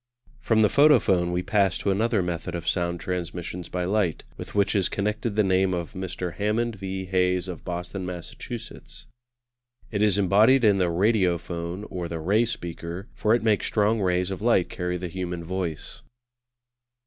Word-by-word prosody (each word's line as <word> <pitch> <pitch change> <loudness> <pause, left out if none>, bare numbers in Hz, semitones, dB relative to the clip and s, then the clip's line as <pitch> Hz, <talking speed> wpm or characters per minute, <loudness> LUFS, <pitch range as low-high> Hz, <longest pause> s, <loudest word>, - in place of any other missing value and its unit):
From 115 -3 +2
the 105 - +6
Photophone 105 -12 +4
we 90 +1 -1
pass 100 -1 +2
to 100 - 0
another 110 0 +1
method 85 -1 -3
of 85 -1 -5
sound 85 0 0
transmission 90 0 -4
by 90 0 -1
light, 95 -4 0
with - - -9
which 100 -1 +3
is 95 -3 +2
connected 105 +2 -2
the 105 - +4
name 95 -1 +2
of 85 +1 -5
Mr. 90 -2 -4
Hammond 110 +3 0
V. 95 0 -4
Hayes 90 -1 +1
of 90 -4 -7
Boston, 90 +2 -4
Massachusetts. 90 -2 -7 0.9
It 105 -2 -1
is 105 -2 +3
embodied 105 +7 +5
in 100 -3 +5
the 90 -2 +2
Radiophone, 90 -1 0
or 90 -2 -3
the 85 -1 -5
Ray 100 +8 +2
speaker, 85 -2 -6
for 110 +2 +2
it 120 - -1
makes 110 -3 +2
strong 105 +1 +2
rays 90 0 +1
of 95 - -5
light 110 -6 +3
carry 90 0 -3
the 90 0 -4
human 90 -1 -4
voice. 85 -3 -4
95 Hz, 170 wpm, -25 LUFS, 90-105 Hz, 0.9 s, the